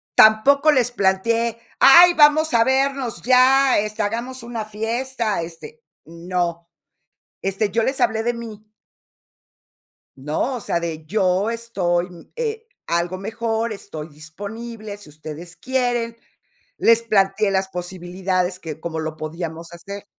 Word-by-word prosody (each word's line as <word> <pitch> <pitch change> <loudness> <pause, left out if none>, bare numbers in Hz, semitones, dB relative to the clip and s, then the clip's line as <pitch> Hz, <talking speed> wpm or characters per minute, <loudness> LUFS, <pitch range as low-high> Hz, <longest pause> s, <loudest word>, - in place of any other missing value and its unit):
Tampoco 275 +8 +6
les 250 -4 +2
planteé: 230 +3 +1 0.2
"Ay, 350 +5 +9
vamos 310 0 +5
a 230 -1 +5
vernos 265 -1 0
ya, 260 +1 +5
este, 215 +1 -2
hagamos 235 +4 -4
una 235 -2 -5
fiesta", 225 0 -2
este, 175 - -10 0.2
no. 170 0 -3 0.8
Este, 195 +2 -1
yo 230 +3 +1
les 265 +4 -1
hablé 220 0 +2
de 240 +1 0
mí. 215 -2 -10 1.5
¿No?, 150 - -2
o - - -6
sea, 185 - -1
de 165 -2 -5
yo 190 +2 +1
estoy, 190 -7 -1 0.3
eh, 455 -1 -3 0.2
algo 170 +2 -1
mejor, 225 +2 -2
estoy 160 -7 -8
disponible, 205 +8 -8
si 205 -5 -15
ustedes 155 +3 -10
quieren, 245 -3 -1 0.6
les 230 0 +4
planteé 200 -2 +2
las 190 0 0
posibilidades 180 0 -3
que 155 -3 -7
como 160 -1 -4
lo 155 0 -5
podíamos 165 +1 -6
hacer. 200 +4 -9
215 Hz, 130 wpm, -21 LUFS, 175-235 Hz, 1.5 s, Ay